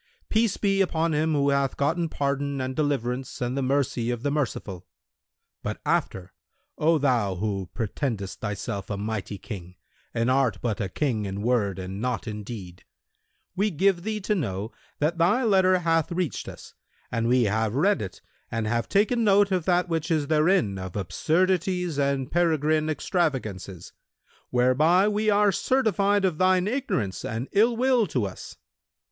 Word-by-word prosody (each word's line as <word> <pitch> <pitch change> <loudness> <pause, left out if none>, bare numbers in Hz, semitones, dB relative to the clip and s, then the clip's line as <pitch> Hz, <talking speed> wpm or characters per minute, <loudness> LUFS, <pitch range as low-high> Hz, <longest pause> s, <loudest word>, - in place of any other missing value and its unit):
Peace 225 -1 +2
be 195 -1 +2
upon 165 -3 +1
him 155 +1 +1
who 140 -1 +2
hath 140 -1 0
gotten 165 +4 0
pardon 140 -1 -1
and 130 0 -3
deliverance 135 -3 -2
and 125 +1 -2
the 140 - 0
mercy 130 -3 0
of 120 -1 -3
the 145 - 0
Merciful! 105 - -3 0.7
But - - -4
after, 95 0 -1 0.5
O 160 +2 +4
thou 120 -9 +1
who 95 -1 -3
pretendest 110 -3 -3
thyself 100 -2 -4
a 100 - -2
mighty 105 -1 -4
King 90 -4 -8 0.4
and 115 +2 0
art 130 -4 +2
but 115 -3 -2
a 95 - -2
King 115 -4 -1
in 100 +1 -4
word 110 -6 +1
and 95 +2 -6
not 125 -1 -2
in 105 -1 -5
deed, 95 -5 -9 0.7
we 205 +3 +1
give 190 +1 +2
thee 215 +3 -3
to 210 - 0
know 110 - -3 0.3
that 160 +4 0
thy 205 +10 +3
letter 190 -4 +4
hath 165 -2 +1
reached 175 -3 -2
us - - -12 0.4
and 115 0 0
we 125 +1 +4
have 110 +1 0
read 195 +8 +2
it 95 -3 -7 0.3
and 115 -1 -2
have 115 +1 -1
taken 220 +4 +2
note 200 -1 +4
of 180 -4 0
that 180 -1 +2
which 165 -1 -2
is 155 -3 +1
therein 155 - +2
of 95 -1 -7
absurdities 180 - 0
and 140 -1 0
peregrine 155 -2 +2
extravagances, 120 - -2 0.6
whereby 150 +10 +4
we 210 +1 +1
are 205 0 +4
certified 205 -2 +2
of 175 -5 -1
thine 185 0 +3
ignorance 210 - -2
and 115 +4 -3
ill 230 +3 +3
will 250 -3 +3
to 125 -9 -1
us. 95 - -8
140 Hz, 165 wpm, -26 LUFS, 110-180 Hz, 0.7 s, O